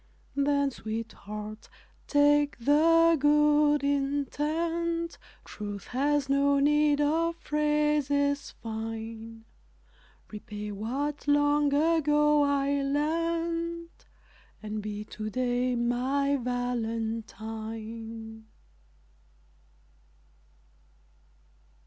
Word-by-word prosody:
Then, 280 0 +2
sweetheart, 215 -2 -7 0.4
take 290 0 +3
the 330 +6 +4
good 295 0 +4
intent 310 +4 -1 0.3
Truth 205 -1 -7
has 285 +2 +1
no 280 +1 +3
need 295 +1 +3
of 325 +3 +1
phrases 295 -2 0
fine 225 0 -7 0.9
Repay 210 0 -7
what 270 +9 -3
long 290 0 +3
ago 300 -1 +3
I 280 0 +1
lent, 335 +3 -2 0.6
And 215 0 -4
be 210 0 -5
to 215 0 -6
day 250 +2 0
my 255 +4 +1
Valentine. 225 -2 -4
280 Hz, 70 wpm, -28 LUFS, 225-295 Hz, 0.9 s, the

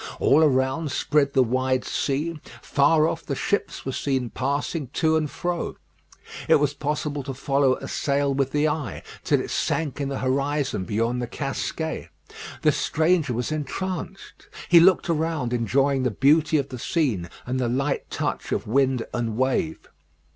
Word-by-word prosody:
All 145 +3 +5
around 135 +2 +1
spread 140 +1 +1
the 130 - +5
wide 130 +1 0
sea; 150 +4 -1 0.2
far 155 +2 +3
off 165 0 -3
the 140 - -3
ships 205 - -2
were 135 - -2
seen 130 -3 -1
passing 140 +2 -2
to 160 0 +2
and 155 -2 0
fro. 175 +2 -3 0.7
It - - +6
was 145 -1 +2
possible 150 0 -2
to 135 -1 -6
follow 135 -1 +2
a - - -8
sail 140 0 0
with 135 -1 0
the 150 +1 +2
eye, 145 - -3 0.2
till - - +2
it - - -5
sank 145 -4 -1
in 140 - -1
the 135 - -3
horizon 135 -5 -1
beyond 115 +5 -1
the 120 - -3
Casquets. - - -4 0.5
The - - +5
stranger 160 -4 +1
was 125 +5 -2
entranced: 180 +5 -5 0.2
he 170 - +8
looked 185 +2 +5
around, 160 -6 -1
enjoying 135 +4 +1
the 125 - +1
beauty 145 +6 +3
of 140 -2 -1
the 125 - -7
scene, 115 - -1 0.2
and 130 +1 -2
the 125 -2 0
light 140 +3 -1
touch - - -3
of - - -1
wind 130 +1 +1
and 115 -3 -2
wave. 130 -11 -1
140 Hz, 165 wpm, -24 LUFS, 130-155 Hz, 0.7 s, he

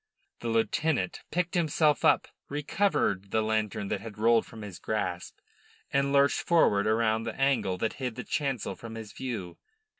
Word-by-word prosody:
The 120 - -5
lieutenant 115 - 0
picked 180 +1 -1
himself 155 -3 +2
up, - - +4 0.2
recovered 145 - 0
the 110 +2 +1
lantern 110 -2 -1
that 100 - -2
had 110 -2 -9
rolled 115 +1 +3
from 110 -3 -10
his 95 -3 -8
grasp, 90 -5 -3 0.6
and 140 0 +2
lurched 140 0 +4
forward 105 -12 +3
round 110 +1 +1
the 115 - -5
angle 135 -9 +2
that 110 +4 -1
hid 125 -3 -2
the 125 - -5
chancel 135 -6 -2
from 115 -1 -9
his 110 -2 -8
view. 110 -10 -5
115 Hz, 160 wpm, -29 LUFS, 105-140 Hz, 0.6 s, up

